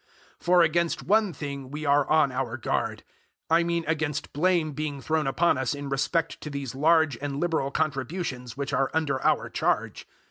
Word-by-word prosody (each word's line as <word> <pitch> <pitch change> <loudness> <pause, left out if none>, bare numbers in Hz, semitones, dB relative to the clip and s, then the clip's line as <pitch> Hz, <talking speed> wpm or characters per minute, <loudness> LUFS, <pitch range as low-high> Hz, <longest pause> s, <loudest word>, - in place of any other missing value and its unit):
008:020 - - -26
For 175 +1 +5
against 170 +1 +1
one 215 -1 +3
thing 140 -3 -6
we 150 +3 -5
are 140 -1 +3
on 155 -3 +4
our 125 -2 -3
guard 120 - -2 0.5
I 165 +1 +5
mean 170 -1 -1
against 155 -2 -2
blame 165 0 +2
being 150 -1 -4
thrown 155 0 0
upon 150 +1 +2
us 130 +2 -1
in 145 -1 -6
respect 165 +4 -1
to 150 - -6
these 140 -3 -5
large 155 -2 +3
and 140 -1 -3
liberal 160 -5 0
contributions 140 -3 -3
which 140 0 -3
are 135 -1 +2
under 145 -5 0
our - - +2
charge. - - -1
150 Hz, 180 wpm, -26 LUFS, 135-165 Hz, 0.5 s, For